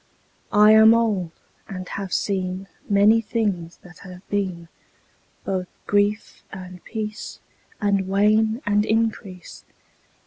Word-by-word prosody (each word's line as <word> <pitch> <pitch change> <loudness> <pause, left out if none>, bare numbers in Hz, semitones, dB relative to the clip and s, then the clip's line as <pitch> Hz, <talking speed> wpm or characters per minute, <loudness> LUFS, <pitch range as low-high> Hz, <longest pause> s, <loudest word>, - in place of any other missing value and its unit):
I 210 +1 +7
am 220 +1 +7
old 210 -7 0 0.4
and 185 -1 -7
have 195 -2 -5
seen 190 -1 -2 0.2
Many 210 +3 +5
things 200 -7 -2
that 175 -1 -15
have 185 0 -12
been; 185 -4 -3 0.8
Both 185 -2 -3 0.2
grief 205 +1 0
and 185 -1 -10
peace 215 -1 -6 0.4
And 200 -2 0
wane 215 +4 +2
and 205 0 +2
increase. 215 -5 -3
200 Hz, 110 wpm, -22 LUFS, 185-215 Hz, 0.8 s, I